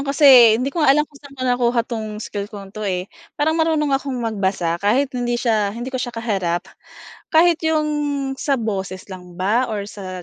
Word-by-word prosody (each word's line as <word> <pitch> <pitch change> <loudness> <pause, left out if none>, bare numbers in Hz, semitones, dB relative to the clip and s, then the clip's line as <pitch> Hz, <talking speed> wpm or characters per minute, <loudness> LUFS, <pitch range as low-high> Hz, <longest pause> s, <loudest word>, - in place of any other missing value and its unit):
kasi 265 -5 +7
hindi 255 +3 -1
ko 340 - -2
nga 270 - +7
alam 300 +1 +2
kung 285 - -19
saan 285 -1 -14
ko 255 - -6
nakuha 245 -1 +2
'tong 220 -3 -5
skill 205 -2 -4
kong 200 -2 -10
'to 215 - -4
eh. 185 -1 -2 0.3
Parang 315 +2 +2
marunong 320 -2 +1
akong 270 -1 -1
magbasa 190 -6 -1
kahit 250 +7 +2
hindi 240 -1 -1
siya 215 -4 +1
hindi 240 +3 -6
ko - - -1
siya 245 - -4
kaharap. 195 -7 -1 0.7
Kahit 335 0 +5
yung 310 -1 +1 0.5
sa 280 - 0
boses 190 -4 -4
lang 180 -1 -10
ba 215 +7 +1
or 205 -2 -3
sa 185 -3 -8
230 Hz, 195 wpm, -20 LUFS, 200-275 Hz, 0.7 s, kasi